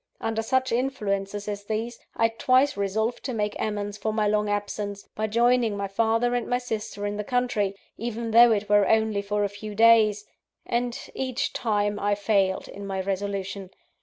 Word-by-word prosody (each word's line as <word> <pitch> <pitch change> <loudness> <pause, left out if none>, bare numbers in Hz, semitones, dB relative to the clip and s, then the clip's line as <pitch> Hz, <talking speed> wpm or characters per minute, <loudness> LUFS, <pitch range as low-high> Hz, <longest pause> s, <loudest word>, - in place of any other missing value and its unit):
Under 225 0 -1
such 260 +3 0
influences 205 -5 -2
as 205 -1 -4
these, 225 +3 -3 0.2
I 225 - +3
twice 255 +5 +2
resolved 215 +4 -1
to 255 -3 -3
make 210 -1 -1
amends 205 -1 -3
for 220 - -1
my 215 -1 +1
long 210 0 +1
absence, 205 0 -3
by 215 0 -2
joining 235 -1 +2
my 200 0 -2
father 225 +4 +1
and 245 -1 -1
my 245 - +1
sister 220 -4 -4
in 205 0 -2
the 210 - -2
country, 220 -4 0 0.2
even 230 0 -3
though 235 +1 +8
it 210 -1 0
were 205 -1 +4
only 220 -2 +2
for 205 +1 -1
a - - +2
few 205 +1 -8
days 215 -2 +5 0.4
and, 240 0 -1 0.2
each 260 -2 -2
time, 205 -3 0
I 205 0 +1
failed 200 -2 +1
in 200 0 -8
my 190 -1 -3
resolution. 195 0 -3
210 Hz, 180 wpm, -26 LUFS, 205-230 Hz, 0.4 s, though